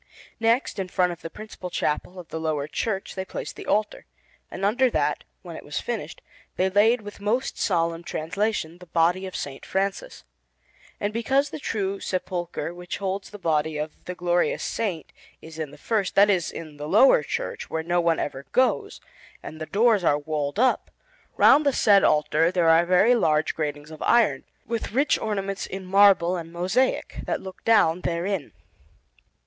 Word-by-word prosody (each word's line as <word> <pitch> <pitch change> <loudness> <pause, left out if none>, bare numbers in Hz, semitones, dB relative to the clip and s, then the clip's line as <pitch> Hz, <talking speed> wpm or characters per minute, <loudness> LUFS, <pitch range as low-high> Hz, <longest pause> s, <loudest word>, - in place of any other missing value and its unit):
Next, 230 0 +1
in 190 - -2
front 180 -1 +1
of 170 - -9
the 165 - -6
principal 210 -2 -9
chapel 175 +2 -2
of 175 -2 -10
the 160 - -5
lower 155 -3 -2
church, 195 +4 -3
they 190 - -4
placed 190 - -7
the - - -10
altar, 210 +1 -1 0.4
and 195 - -4
under 250 +5 +3
that, - - 0 0.2
when - - -8
it - - -9
was - - -4
finished, - - -5 0.3
they 190 +1 +1
laid, 220 +4 +4
with 205 0 -10
most 230 +6 -1
solemn 170 -3 0
translation, 175 +1 -2
the 180 - -13
body 175 +3 +1
of 185 - -9
S. 135 -1 -5
Francis. 195 - -3 0.8
And 205 +1 -2
because 270 +5 +1
the - - -6
true 200 -7 -2
sepulchre 175 -2 -3
which 175 0 -6
holds 195 0 -3
the 205 - -10
body 155 -4 0
of 150 +1 -3
the 180 - -5
glorious 175 0 0
Saint 185 -9 -3 0.3
is 160 0 -11
in 155 -2 -3
the 145 - -14
first 210 -5 -1
that 205 +1 +6
is, 180 -4 0
in 155 -3 -9
the 145 +1 -6
lowest 200 - +5
church - - -4
where 160 0 -2
no 175 +1 +1
one 170 -1 +2
ever 135 -1 -4
goes, 260 0 +1 0.4
and 155 0 -9
the 155 - -4
doors 215 -2 +3
are 145 -3 +3
walled 145 +1 -3
up, 255 +3 +2 0.5
round 300 - +6
the 285 - +3
said 205 -5 +5
altar 150 +2 +3
there 175 -3 +2
are 165 +1 +5
very 185 +7 +5
large 155 -9 +2
gratings 150 -1 -4
of 155 - -11
iron, 220 - +3 0.2
with 230 -2 -4
rich 280 +5 +2
ornaments 195 -2 -3
in 190 0 -6
marble 185 -2 +5
and 165 -1 -7
mosaic, 185 +10 0
that - - -1
look 190 -1 -10
down 180 -7 +4
therein. 175 -1 -2
185 Hz, 180 wpm, -25 LUFS, 160-210 Hz, 0.8 s, that